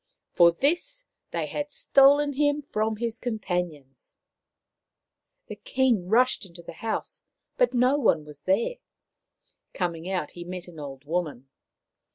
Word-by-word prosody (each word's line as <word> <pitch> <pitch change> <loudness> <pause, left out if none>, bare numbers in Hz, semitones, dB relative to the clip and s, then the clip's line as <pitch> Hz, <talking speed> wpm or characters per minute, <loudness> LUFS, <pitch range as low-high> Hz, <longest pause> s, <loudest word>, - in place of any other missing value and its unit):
For 170 -1 +6
this 350 - -1 0.2
they - - -2
had 295 0 -4
stolen 285 +1 +4
him 290 +1 +1
from 220 -5 -1
his 230 +1 -4
companions! 175 - -4 1.3
The 210 - -8
King 230 -3 +1
rushed 245 +5 +3
into 170 -2 -11
the - - -9
house, 220 +6 -4 0.3
but - - +2
no 250 +3 +4
one 165 - +2
was 150 -1 -12
there. 200 - 0 1.0
Coming 175 -1 -2
out, 190 -2 -2
he 175 - -8
met 180 0 -7
an 170 -3 -11
old 140 -1 -8
woman. 150 -5 -3
205 Hz, 135 wpm, -26 LUFS, 170-265 Hz, 1.3 s, For